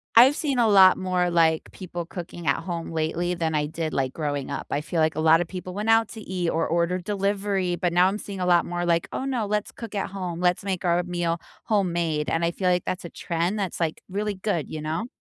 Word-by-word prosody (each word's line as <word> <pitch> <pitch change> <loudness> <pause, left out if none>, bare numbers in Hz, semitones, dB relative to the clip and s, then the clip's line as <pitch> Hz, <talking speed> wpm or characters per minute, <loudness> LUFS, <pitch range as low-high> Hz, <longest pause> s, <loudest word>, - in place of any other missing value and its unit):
I've 255 +5 +8
seen 280 -5 -1
a 230 - +4
lot 190 -3 +7
more, 180 -1 0
like, 165 -2 +2
people 175 -2 -6
cooking 170 -1 -8
at - - +3
home 170 -2 -4
lately 165 +2 -1
than 160 -2 -1
I 150 -1 +1
did, 160 0 -4
like, 130 -1 0
growing 145 -3 -3
up. - - -4
I 145 - 0
feel 165 +2 -3
like 155 -1 +2
a - - -2
lot 160 +1 +6
of 175 - -2
people 185 0 -7
went 210 +3 -2
out 225 -1 +4
to 220 - -9
eat 180 -3 -2
or 165 - 0
ordered 170 +2 0
delivery, 195 -2 0
but 175 0 -1
now, 180 +1 +5
I'm 195 +2 -1
seeing 200 -2 -7
a 180 - 0
lot 175 -1 +4
more, 175 0 -2
like, 170 -1 +1
"Oh, - - -2
no, 250 -5 -1
let's 210 0 -1
cook 225 -3 -8
at 195 - -1
home." 180 -3 -4
"Let's 180 0 +2
make 190 -3 -2
our 175 0 +2
meal 175 -1 -1 0.3
homemade." 170 -7 0
and 165 - 0
I 170 - +2
feel 185 +1 0
like 180 0 +1
that's 185 -1 -3
a - - -6
trend 175 +6 -2
that's, 190 -4 -3
like, 165 -2 -1
really 205 +2 -2
good, 190 -5 -2
you 155 - -5
know? 160 +9 -2
175 Hz, 250 wpm, -25 LUFS, 165-195 Hz, 0.3 s, I've